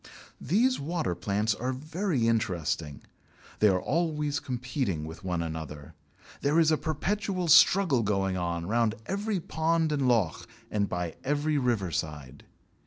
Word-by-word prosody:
These 235 - +2
water 160 - -2
plants 105 +5 0
are 125 +4 -3
very 155 - -1
interesting. 85 -9 -1 0.6
They 105 - +5
are 95 -2 +3
always 150 - -1
competing 125 - -3
with 80 +1 -9
one 90 -2 -1
another. 80 -1 -7 0.5
There 145 +4 +3
is 160 -1 +4
a - - +5
perpetual 185 +4 -2
struggle 160 -4 +6
going 95 -3 0
on 85 -2 -2
round 115 +2 +1
every 200 - -1
pond 160 0 0
and 140 -3 +1
loch, 110 -10 +1 0.2
and 100 -2 0
by 90 -2 -3
every 145 +1 +1
river 115 -9 0
side. 75 -4 -5
120 Hz, 140 wpm, -28 LUFS, -, 0.6 s, struggle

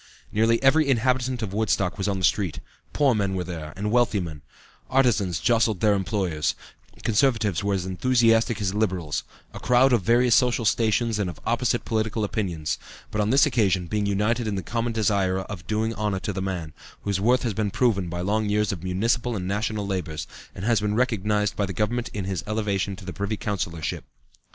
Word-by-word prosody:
Nearly 115 +2 +3
every 140 +2 +4
inhabitant 125 0 +1
of 100 -3 -4
Woodstock 100 -3 0
was 95 - -1
on 100 -1 0
the 95 - +1
street. 95 -5 0 0.3
Poor 140 -3 +3
men 100 -3 0
were 90 - -1
there; 80 -3 -6
and 105 +2 -2
wealthy 120 -3 +3
men; 80 -5 -6 0.5
artisans 115 -10 +2
jostled 115 0 +2
their 105 +1 +4
employers; 95 -6 -1 0.5
Conservatives 110 - +2
were 100 0 +1
as 90 -2 -2
enthusiastic 115 +2 +2
as 100 -2 -1
Liberals, 90 - -1 0.3
a - - -7
crowd 125 +1 +4
of 120 - +3
various 120 +5 +3
social 125 -1 +3
stations 115 +1 +1
and 100 -3 0
of 85 - -9
opposite 120 0 0
political 110 0 -1
opinions, 90 -7 -2 0.3
but 105 - 0
on 105 - 0
this 135 +5 +5
occasion 100 -10 +1
being 105 +3 -1
united 110 +4 0
in 105 - -1
the 95 - -3
common 115 +5 -2
desire 100 -4 +1
of 95 -3 -8
doing 110 +1 0
honor 105 -2 -1
to 100 - -3
the 95 - -3
man, 90 -5 -4 0.3
whose 100 -2 -1
worth 120 +3 +3
has 115 -4 -1
been 105 0 -1
proven 100 -5 +1
by 85 +1 -4
long 105 +3 0
years 105 0 +1
of 90 -4 -6
municipal 115 +6 0
and 90 -3 -3
national 105 +1 -1
labors, 90 -6 -3 0.3
and 95 - -5
has 115 -2 +3
been 105 0 0
recognized 105 -3 +1
by 100 - 0
the 95 - -5
Government 115 +5 -1
in 100 -3 -4
his 95 -2 -3
elevation 105 -2 -1
to 95 - -12
the 90 - -5
Privy 100 +2 -3
Councillorship." 85 -7 -3
105 Hz, 195 wpm, -25 LUFS, 95-115 Hz, 0.5 s, this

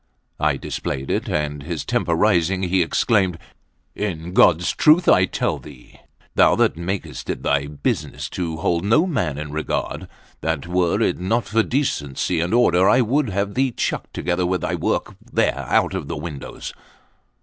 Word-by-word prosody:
I 75 -2 +1
displayed 65 0 -4
it; - - -1
and 75 -1 -2
his 80 +2 -5
temper 85 - 0
rising, 95 -1 +2
he 95 0 +2
exclaimed: 95 +1 +1 0.6
"In 90 -4 -4
God's 90 -1 +4
truth 160 +3 +4
I 90 - +6
tell - - -2
thee, 70 -5 -15 0.3
thou - - +5
that - - +2
makest 90 +4 -5
it - - -3
thy 70 0 +1
business 75 -1 -3
to 80 -3 -3
hold 85 +1 0
no 115 - +4
man 90 - -1
in 75 -1 -5
regard, 75 +1 -3 0.3
that, 80 -2 -2
were 90 -1 +1
it - - +1
not 110 +5 0
for 115 +2 +2
decency 90 - -1
and 85 +2 -1
order, 95 -6 +4
I 125 - +5
would 130 +3 +1
have 100 +1 -2
thee 135 +1 +2
chucked 120 - -3
together 90 0 0
with 90 -2 -1
thy - - -2
work - - -1 0.2
there 70 - +1
out - - +2
of 95 -7 -4
windows." 80 -3 -6
90 Hz, 165 wpm, -21 LUFS, 80-100 Hz, 0.6 s, I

